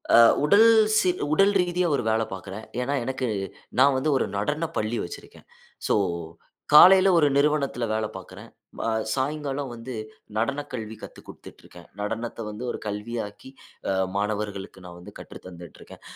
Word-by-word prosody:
அ, - - +8 0.3
உடல் 205 +8 +6 0.3
சீ 190 -4 +3 0.2
உடல் 195 +5 +4
ரீதியா 180 0 0
ஒரு 125 - -2
வேல 110 +1 +1
பாக்குறேன். 95 +3 -8 0.2
ஏனா, 130 +3 -2
எனக்கு 130 +1 -3 0.5
நான் 135 +1 +5
வந்து 140 +4 0
ஒரு - - 0
நடனப்பள்ளி 120 -2 -2
வச்சுருக்கேன். 85 - -12 0.4
சோ - - +2 0.8
காலையில 190 +5 +8
ஒரு 150 -3 +4
நிறுவனத்தில 140 -4 +1
வேல 110 0 0
பாக்குறேன். 95 -1 -10 0.4
அ, - - +1 0.2
சாயங்காலம் 140 -1 -3
வந்து 120 +2 -8 0.4
நடனக் 140 +6 -2
கல்வி 110 -2 -5
கத்து - - -11
கொடுத்துட்டு - - -13
இருக்கேன். 85 -1 -15
நடனத்தை 115 +2 -4
வந்து 105 +3 -7
ஒரு - - -5
கல்வியாக்கி, 105 +2 -6 0.4
அ, - - +1 0.2
மாணவர்களுக்கு 100 -2 -4
நான் 90 -1 -10
வந்து 90 - -12
கற்று - - -11
தந்துட்டுருக்கேன். 85 -2 -13
120 Hz, 145 wpm, -25 LUFS, 105-145 Hz, 0.8 s, அ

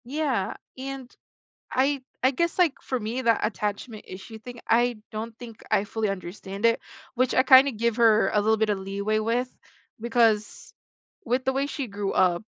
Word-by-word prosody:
Yeah, 270 -6 -1 0.2
and 265 -1 -7 0.6
I 270 +1 +1 0.2
I 260 - +5
guess, 340 +7 -1
like, 345 -6 +4
for 260 - -2
me, 235 +3 -3
that 230 -2 +3
attachment 210 +1 -4
issue 195 +4 -9
thing, 240 +2 -10
I 240 +1 +3 0.2
don't 220 +1 -5
think 230 -3 -11
I 195 - +3
fully 220 0 -2
understand 195 +2 -6
it, 230 - +2 0.3
which 255 +1 +1
I 255 - +5
kinda 265 +1 +8
give 230 0 0
her 225 -2 +5
a 210 - +2
little 220 +2 +3
bit 220 0 +1
of 205 - 0
leeway 200 +3 -1
with, 240 +3 -1 0.5
because 225 -2 +1 0.5
with 255 +2 0
the 265 - +1
way 270 +1 0
she 285 -2 -4
grew 200 -2 -3
up, 180 0 +2
230 Hz, 175 wpm, -26 LUFS, 210-255 Hz, 0.6 s, kinda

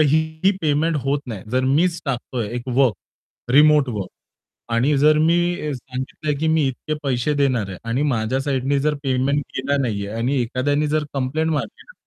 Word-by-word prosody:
एकही 160 +4 +2
पेमेंट 155 +2 +1
होत 140 +1 +1
नाही, 110 -6 -6
जर 130 +2 +1
मीच 170 +2 +2
टाकतोय 125 -4 -3
एक 120 - -4
वर्क, 125 -2 +3 0.6
रिमोट 150 0 +6
वर्क. 105 -6 -3 0.7
आणि 140 +5 +2
जर 150 +2 +5
मी 165 +1 +4 0.3
अ, - - -2
सांगितलं, 130 +3 -4
की 160 - 0
मी 150 -4 +2
इतके 135 +4 -4
पैसे 135 +2 0
देणार 125 -8 +1
आहे. 95 - -7
आणि 125 +5 0
माझ्या 115 +3 -1
साइडनी 140 0 0
जर 150 -1 +2
पेमेंट 135 +2 +1
केला 140 +2 0
नाहीये 100 -5 -2
आणि 130 +3 +1
एखाद्याने 145 +5 0
जर 155 -1 +2
कंप्लेंट 140 +4 -1
मारली 145 -2 -3
ना, - - -16
140 Hz, 175 wpm, -21 LUFS, 125-150 Hz, 0.7 s, रिमोट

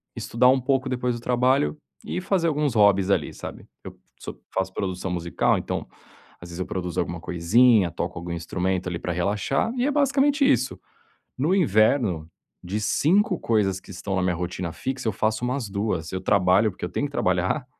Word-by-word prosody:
estudar 120 +2 +1
um 130 0 +4
pouco 135 0 0
depois 125 -1 -1
do 115 - -8
trabalho 125 +5 +1 0.3
e 180 - -3
fazer 185 -3 +1
alguns 150 -4 0
hobbies 100 -2 +4
ali, - - +1
sabe. - - -9 0.2
Eu - - -10 0.2
so - - -8
faço 95 0 -1
produção 95 -1 -3
musical 85 -1 +1
então, - - -4 0.5
às 85 - -11
vezes 85 +1 -8
eu 90 - -2
produzo 90 -2 -4
alguma 85 -1 -2
coisinha, 95 +4 +3
toco 85 +2 -4
algum 85 0 -6
instrumento 90 +2 -2
ali 85 -2 -3
pra 90 - -3
relaxar, 105 - 0
e 245 - +1
é - - +1
basicamente 285 0 +3
isso. - - +1 0.6
No 155 +8 +1
inverno, 110 - +2 0.3
de 100 +4 -3
5 185 - +2
coisas 100 -4 +1
que 95 - -14
estão 95 +1 -4
na - - +1
minha 90 -1 +1
rotina 90 0 -4
fixa 130 -3 -4
eu - - +2
faço 110 +4 -1
umas 125 -3 -2
2. 95 -5 -2
Eu 95 - -3
trabalho 95 +2 +3
porque 90 - -13
eu - - -5
tenho 140 - -2
que - - -15
trabalhar. 95 +5 0
105 Hz, 190 wpm, -24 LUFS, 90-130 Hz, 0.6 s, um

